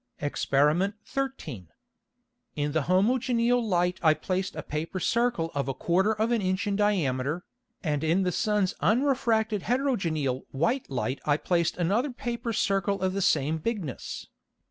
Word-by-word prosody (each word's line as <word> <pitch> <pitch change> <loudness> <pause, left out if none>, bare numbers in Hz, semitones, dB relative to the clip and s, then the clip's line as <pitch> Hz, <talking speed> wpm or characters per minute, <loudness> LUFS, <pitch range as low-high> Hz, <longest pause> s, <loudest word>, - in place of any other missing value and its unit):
Exper. 150 +7 +1
13. 165 - -4 0.9
In 145 0 -1
the 160 +1 +1
homogeneal 240 +4 +3
Light 180 -3 +1
I 155 -2 +5
placed 185 +4 -2
a 155 - -5
Paper 160 +5 -4
Circle 230 -6 +1
of 140 -1 -1
a 135 - -2
quarter 185 +8 +2
of 220 +2 0
an 235 -2 +2
Inch 185 0 0
in 200 -1 0
diameter, 165 -7 0 0.4
and 150 -3 -1
in 170 +5 +2
the 180 - +1
Sun's 205 0 +1
unrefracted 225 -4 +2
heterogeneal 175 - 0
white 230 - 0
Light 130 0 -2
I 145 -1 +2
placed 170 +2 0
another 200 - +1
Paper 240 -2 -4
Circle 195 -2 +1
of 185 0 0
the 195 - -1
same 155 -2 +2
Bigness. 180 - -4
185 Hz, 145 wpm, -27 LUFS, 155-225 Hz, 0.9 s, I